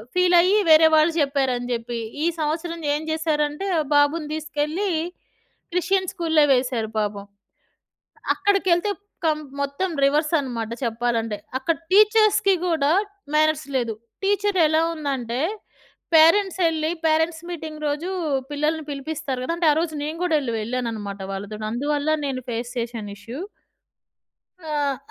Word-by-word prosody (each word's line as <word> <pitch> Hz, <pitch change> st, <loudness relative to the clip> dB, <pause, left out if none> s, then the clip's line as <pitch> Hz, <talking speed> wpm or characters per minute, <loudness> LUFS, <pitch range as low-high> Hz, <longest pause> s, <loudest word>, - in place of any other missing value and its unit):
Feel 360 Hz, -1 st, +4 dB
అయ్యి 385 Hz, +4 st, +3 dB
వేరే 315 Hz, 0 st, +8 dB
వాళ్ళు 310 Hz, +2 st, +4 dB
జెప్పారని 265 Hz, -4 st, 0 dB
జెప్పి 235 Hz, 0 st, -4 dB, 0.3 s
ఈ -, -, +3 dB
సంవత్సరం 330 Hz, +2 st, -2 dB
ఏం 305 Hz, -, -3 dB
జేశారంటే, 310 Hz, +2 st, -1 dB, 0.3 s
బాబుని 295 Hz, +2 st, +3 dB
దీసుకెళ్ళి 310 Hz, +5 st, -2 dB, 0.8 s
క్రిస్టియన్ 375 Hz, +1 st, +1 dB
స్కూల్‌లో 325 Hz, -5 st, +3 dB
వేశారు 250 Hz, -3 st, 0 dB
పాపం. 205 Hz, -1 st, -3 dB, 1.1 s
అక్కడికెళ్తే 390 Hz, -1 st, +2 dB, 0.3 s
కం 310 Hz, -2 st, +2 dB, 0.2 s
మొత్తం 280 Hz, +7 st, -1 dB
రివర్సన్నమాట 275 Hz, -6 st, +1 dB
చెప్పాలంటే. 230 Hz, -2 st, -1 dB, 0.2 s
అక్కడ 325 Hz, +4 st, 0 dB
టీచర్స్‌కి 425 Hz, -1 st, +5 dB
గూడా 315 Hz, -4 st, +2 dB, 0.4 s
మ్యానర్స్ 310 Hz, 0 st, +2 dB
లేదు. 230 Hz, -3 st, -1 dB, 0.3 s
టీచర్ 405 Hz, -1 st, +1 dB
ఎలా 315 Hz, +1 st, +3 dB
ఉందంటే, 265 Hz, -5 st, -3 dB, 0.8 s
పేరెంట్స్ 375 Hz, +4 st, +5 dB
ఎళ్ళి 315 Hz, 0 st, -1 dB, 0.2 s
పేరెంట్స్ 320 Hz, +1 st, +1 dB
మీటింగ్ 310 Hz, -2 st, -6 dB
రోజు 300 Hz, +5 st, -2 dB, 0.4 s
పిల్లల్ని 305 Hz, +2 st, -1 dB
పిలిపిస్తారు 280 Hz, -2 st, -4 dB
గదా, 335 Hz, -, -1 dB
అంటే 335 Hz, -2 st, +3 dB
ఆరోజు 320 Hz, +1 st, -1 dB
నేను 315 Hz, +2 st, -4 dB
గూడా 350 Hz, -3 st, +1 dB
వెళ్ళ 265 Hz, -4 st, -3 dB
వెళ్ళానన్నమాట 215 Hz, -4 st, -4 dB
వాళ్ళతోని 210 Hz, +2 st, -5 dB
అందువల్ల 290 Hz, +4 st, -1 dB, 0.2 s
నేను 260 Hz, -2 st, -3 dB
ఫేస్ 240 Hz, +1 st, -4 dB
చేశాను 230 Hz, -3 st, -4 dB
ఇష్యూ. 235 Hz, +8 st, -8 dB, 1.3 s
ఆహ్, 290 Hz, -2 st, 0 dB
305 Hz, 120 wpm, -23 LUFS, 250-330 Hz, 1.3 s, వేరే